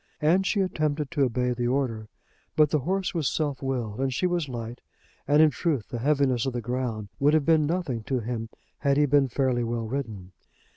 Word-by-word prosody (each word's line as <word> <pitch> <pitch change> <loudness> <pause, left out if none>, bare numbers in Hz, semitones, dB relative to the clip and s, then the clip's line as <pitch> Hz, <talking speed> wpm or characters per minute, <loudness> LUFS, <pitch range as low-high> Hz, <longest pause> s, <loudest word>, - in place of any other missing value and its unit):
And 180 +5 +3
she 205 - +1
attempted 155 -5 -1
to 155 -4 -1
obey 125 0 0
the 120 0 -1
order. 120 -4 -1 0.5
But 150 -2 +4
the 155 - +3
horse 190 +7 -1
was 160 -7 0
self 145 -4 -2
willed, 125 -5 -3
and 135 0 0
she 130 - -1
was 175 -5 0
light; 120 0 -6 0.5
and 150 +2 +6
in 155 - +5
truth 145 -11 -1
the 120 - -4
heaviness 135 -2 +2
of 130 - -2
the 120 - -2
ground 120 -3 -3
would 145 +2 +4
have 155 -3 +2
been 160 -2 +4
nothing 160 -9 -2
to 130 -2 0
him 115 -1 -4 0.3
had 140 -1 +2
he 150 - +5
been 140 -1 +3
fairly 125 -1 0
well 115 0 -2
ridden. 110 -7 -5
135 Hz, 205 wpm, -26 LUFS, 120-150 Hz, 0.5 s, and